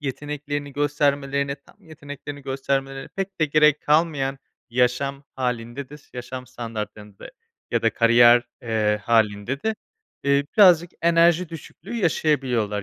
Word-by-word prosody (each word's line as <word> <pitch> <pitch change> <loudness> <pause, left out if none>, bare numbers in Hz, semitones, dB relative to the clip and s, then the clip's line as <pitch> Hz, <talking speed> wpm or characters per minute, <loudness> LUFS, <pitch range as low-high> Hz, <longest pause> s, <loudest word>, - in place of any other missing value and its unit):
yeteneklerini 145 +1 -5
göstermelerini, 140 -1 0
tam - - -20
yeteneklerini 145 -2 -9
göstermeleri 135 0 -3
pek 195 -2 -6
de 155 - +5
gerek 150 0 +4
kalmayan 150 -3 +1 0.3
yaşam 125 +3 0
hâlinde 125 +1 -3
de 150 - -10
s - - -26
yaşam 125 +1 -7
standartlarında 105 -4 -8 0.4
ya - - 0
da - - +3
kariyer, 120 +1 +6 0.2
eee, 110 -2 0
hâlinde 110 +3 +1
de, 220 0 0 0.5
eee, 140 0 +3
birazcık 175 -4 +6
enerji 170 0 +4
düşüklüğü 165 +7 -10
yaşayabiliyorlar. 130 - 0
140 Hz, 120 wpm, -23 LUFS, 120-150 Hz, 0.5 s, kariyer